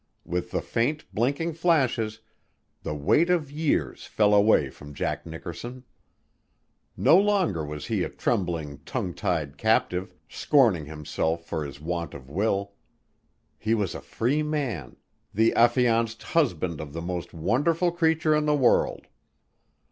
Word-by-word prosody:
With 90 Hz, 0 st, -3 dB
the -, -, -2 dB
faint, 145 Hz, +7 st, -1 dB
blinking 140 Hz, -, 0 dB
flashes, 130 Hz, -10 st, +1 dB, 0.6 s
the 75 Hz, -, -4 dB
weight 150 Hz, -, +3 dB
of 160 Hz, -6 st, +1 dB
years 150 Hz, 0 st, -1 dB
fell 105 Hz, -1 st, +3 dB
away 100 Hz, -10 st, +4 dB
from 75 Hz, +1 st, -12 dB
Jack -, -, -3 dB
Nickerson. 85 Hz, +10 st, -7 dB, 1.1 s
No 170 Hz, -, +6 dB
longer 195 Hz, -, +1 dB
was 75 Hz, 0 st, -6 dB
he -, -, -1 dB
a -, -, -1 dB
trembling, 80 Hz, -6 st, -2 dB
tongue 95 Hz, -, -3 dB
tied 80 Hz, -8 st, -2 dB
captive, 95 Hz, -4 st, +1 dB
scorning 115 Hz, -, +3 dB
himself 80 Hz, +2 st, -3 dB
for 80 Hz, -2 st, -3 dB
his 70 Hz, -1 st, -8 dB
want 85 Hz, +1 st, -4 dB
of 65 Hz, -1 st, -11 dB
will. 100 Hz, +2 st, 0 dB, 0.9 s
He 110 Hz, +1 st, +1 dB
was 100 Hz, -5 st, -1 dB
a -, -, -7 dB
free 135 Hz, +7 st, 0 dB
man, 140 Hz, -, -3 dB, 0.4 s
the 110 Hz, +2 st, +4 dB
affianced 115 Hz, -2 st, +3 dB
husband 90 Hz, -, 0 dB
of 75 Hz, -2 st, -8 dB
the 85 Hz, -, -4 dB
most 90 Hz, 0 st, -4 dB
wonderful 155 Hz, -, +1 dB
creature 160 Hz, -2 st, +2 dB
in 150 Hz, 0 st, +1 dB
the 150 Hz, -, +3 dB
world. 130 Hz, -4 st, +2 dB
110 Hz, 140 wpm, -26 LUFS, -, 1.1 s, No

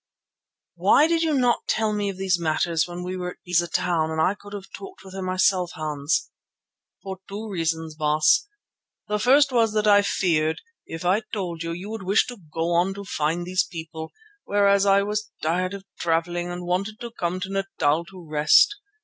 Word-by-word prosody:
"Why 300 Hz, -, +4 dB
did 330 Hz, 0 st, +1 dB
you 320 Hz, -3 st, +1 dB
not 245 Hz, -3 st, +1 dB
tell 215 Hz, -1 st, +1 dB
me 205 Hz, -1 st, -1 dB
of 195 Hz, -, -6 dB
these 190 Hz, -2 st, +1 dB
matters 165 Hz, 0 st, 0 dB
when 175 Hz, 0 st, -6 dB
we 180 Hz, +1 st, -4 dB
were 180 Hz, -1 st, -4 dB
at -, -, -29 dB
Beza 175 Hz, -1 st, +2 dB
Town 165 Hz, -2 st, 0 dB
and 160 Hz, 0 st, -3 dB
I 180 Hz, +4 st, +3 dB
could 205 Hz, 0 st, -14 dB
have 200 Hz, -2 st, -7 dB
talked 385 Hz, -1 st, -11 dB
with 190 Hz, -, -11 dB
her 195 Hz, -, -5 dB
myself, 185 Hz, -1 st, +1 dB
Hans?" 150 Hz, -1 st, -1 dB, 0.7 s
"For 190 Hz, -2 st, -6 dB
two 210 Hz, +3 st, -6 dB
reasons, 160 Hz, -4 st, -2 dB
Baas. 155 Hz, -, +3 dB, 0.6 s
The 210 Hz, 0 st, -1 dB
first 275 Hz, +4 st, +5 dB
was 230 Hz, -3 st, +2 dB
that 215 Hz, 0 st, +1 dB
I 205 Hz, -1 st, +6 dB
feared, 160 Hz, -6 st, +1 dB, 0.3 s
if 165 Hz, +2 st, -7 dB
I 190 Hz, +5 st, +3 dB
told 175 Hz, -6 st, -4 dB
you, 165 Hz, 0 st, -3 dB
you 180 Hz, +5 st, -6 dB
would 225 Hz, -1 st, -5 dB
wish 195 Hz, +3 st, +3 dB
to 245 Hz, -, -8 dB
go 165 Hz, +2 st, -1 dB
on 180 Hz, +3 st, +2 dB
to 200 Hz, -, -7 dB
find 170 Hz, -2 st, -1 dB
these 185 Hz, +1 st, +1 dB
people, 160 Hz, -1 st, -8 dB, 0.3 s
whereas 200 Hz, -1 st, +3 dB
I 200 Hz, 0 st, +5 dB
was 210 Hz, +1 st, -3 dB
tired 180 Hz, +4 st, 0 dB
of 195 Hz, -1 st, -10 dB
travelling 175 Hz, +1 st, 0 dB
and 175 Hz, 0 st, -5 dB
wanted 195 Hz, +5 st, -2 dB
to 235 Hz, -1 st, -6 dB
come 180 Hz, -4 st, -3 dB
to 190 Hz, -, -4 dB
Natal 170 Hz, -5 st, 0 dB
to 185 Hz, -2 st, -13 dB
rest. 155 Hz, -, +4 dB
185 Hz, 195 wpm, -24 LUFS, 165-205 Hz, 0.7 s, I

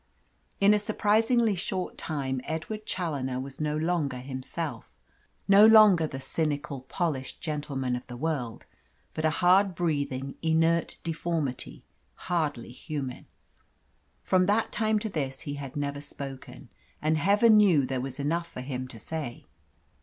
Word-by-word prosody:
In 200 Hz, +1 st, +6 dB
a 210 Hz, -, +3 dB
surprisingly 220 Hz, +2 st, +2 dB
short 185 Hz, 0 st, -3 dB
time 135 Hz, -4 st, -3 dB
Edward 210 Hz, +7 st, -5 dB
Challoner 140 Hz, -8 st, -2 dB
was 135 Hz, +2 st, -7 dB
no 150 Hz, 0 st, 0 dB
longer 155 Hz, -5 st, 0 dB
himself 130 Hz, 0 st, -6 dB, 0.5 s
no 200 Hz, +1 st, +8 dB
longer 215 Hz, -7 st, +7 dB
the 135 Hz, -, -6 dB
cynical, 145 Hz, -1 st, -2 dB
polished 135 Hz, -1 st, -3 dB
gentleman 140 Hz, -5 st, -2 dB
of 125 Hz, -, -7 dB
the 120 Hz, -, -8 dB
world 135 Hz, -6 st, -3 dB, 0.5 s
but 155 Hz, -, -2 dB
a -, -, +5 dB
hard 185 Hz, +4 st, +4 dB
breathing, 140 Hz, -5 st, -1 dB
inert 165 Hz, +1 st, +2 dB
deformity, 160 Hz, -5 st, -3 dB, 0.3 s
hardly 150 Hz, -9 st, -2 dB
human. 135 Hz, -1 st, -6 dB, 1.0 s
From 185 Hz, -1 st, +3 dB
that 215 Hz, +2 st, +2 dB
time 220 Hz, -1 st, +1 dB
to 215 Hz, +1 st, -2 dB
this 135 Hz, -7 st, -3 dB
he 145 Hz, -3 st, -5 dB
had 140 Hz, -2 st, -7 dB
never 145 Hz, 0 st, -3 dB
spoken, 135 Hz, -2 st, -9 dB, 0.3 s
and 155 Hz, +1 st, +1 dB
Heaven 205 Hz, +6 st, +5 dB
knew 180 Hz, -10 st, +5 dB
there 130 Hz, -1 st, -2 dB
was 135 Hz, +1 st, -6 dB
enough 165 Hz, +4 st, -1 dB
for 130 Hz, -, -8 dB
him 130 Hz, -1 st, -4 dB
to 120 Hz, -, -10 dB
say. 140 Hz, +1 st, -6 dB
155 Hz, 140 wpm, -28 LUFS, 135-180 Hz, 1.0 s, no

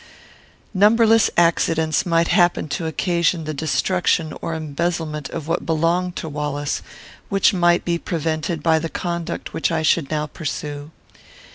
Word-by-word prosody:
Numberless 220 Hz, +3 st, +5 dB
accidents 165 Hz, -1 st, +2 dB
might 165 Hz, 0 st, +2 dB
happen 175 Hz, -3 st, +3 dB
to 165 Hz, +2 st, -3 dB
occasion 170 Hz, 0 st, 0 dB
the 155 Hz, 0 st, -4 dB
destruction 160 Hz, +1 st, 0 dB
or 165 Hz, -, -3 dB
embezzlement 155 Hz, -1 st, -3 dB
of 155 Hz, -, -6 dB
what 165 Hz, -, -1 dB
belonged 170 Hz, +3 st, 0 dB
to -, -, -5 dB
Wallace, 145 Hz, -1 st, -3 dB, 0.5 s
which 195 Hz, +1 st, +3 dB
might 175 Hz, -1 st, +3 dB
be 170 Hz, -1 st, 0 dB
prevented 160 Hz, -1 st, -2 dB
by 160 Hz, -1 st, +3 dB
the 165 Hz, +1 st, -4 dB
conduct 170 Hz, -1 st, -4 dB
which 160 Hz, -, 0 dB
I 160 Hz, -1 st, 0 dB
should 155 Hz, -1 st, +2 dB
now 150 Hz, -1 st, -1 dB
pursue. 145 Hz, -1 st, -5 dB
165 Hz, 140 wpm, -21 LUFS, 155-175 Hz, 0.5 s, Numberless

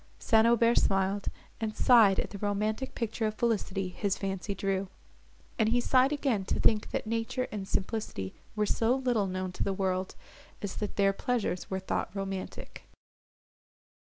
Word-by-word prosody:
St. 225 Hz, -1 st, +4 dB
Aubert 235 Hz, 0 st, +4 dB
smiled, 195 Hz, +1 st, +1 dB, 0.3 s
and 215 Hz, -1 st, -3 dB
sighed 220 Hz, -6 st, +6 dB
at -, -, -2 dB
the 200 Hz, -, -7 dB
romantic 215 Hz, +5 st, -1 dB
picture 225 Hz, -1 st, -1 dB
of 215 Hz, -, -3 dB
felicity 205 Hz, -5 st, 0 dB
his 200 Hz, +1 st, -1 dB
fancy 195 Hz, +1 st, -3 dB
drew; 195 Hz, 0 st, -1 dB, 0.7 s
and 230 Hz, +2 st, +3 dB
sighed 260 Hz, +1 st, +4 dB
again 270 Hz, -9 st, 0 dB
to -, -, -1 dB
think, 215 Hz, -2 st, +3 dB
that -, -, -2 dB
nature 230 Hz, +3 st, -1 dB
and 200 Hz, -2 st, -5 dB
simplicity 190 Hz, -, -3 dB, 0.2 s
were 210 Hz, 0 st, +1 dB
so 225 Hz, +4 st, +2 dB
little 245 Hz, -6 st, +1 dB
known 185 Hz, 0 st, -3 dB
to -, -, -2 dB
the 195 Hz, -, 0 dB
world, 190 Hz, -1 st, -1 dB, 0.5 s
as 205 Hz, -, -3 dB
that 210 Hz, -, -3 dB
their 195 Hz, -1 st, +3 dB
pleasures 220 Hz, -5 st, -2 dB
were 190 Hz, -, -1 dB
thought 190 Hz, -, -2 dB
romantic. 195 Hz, -1 st, -6 dB
210 Hz, 160 wpm, -30 LUFS, 195-230 Hz, 0.7 s, sighed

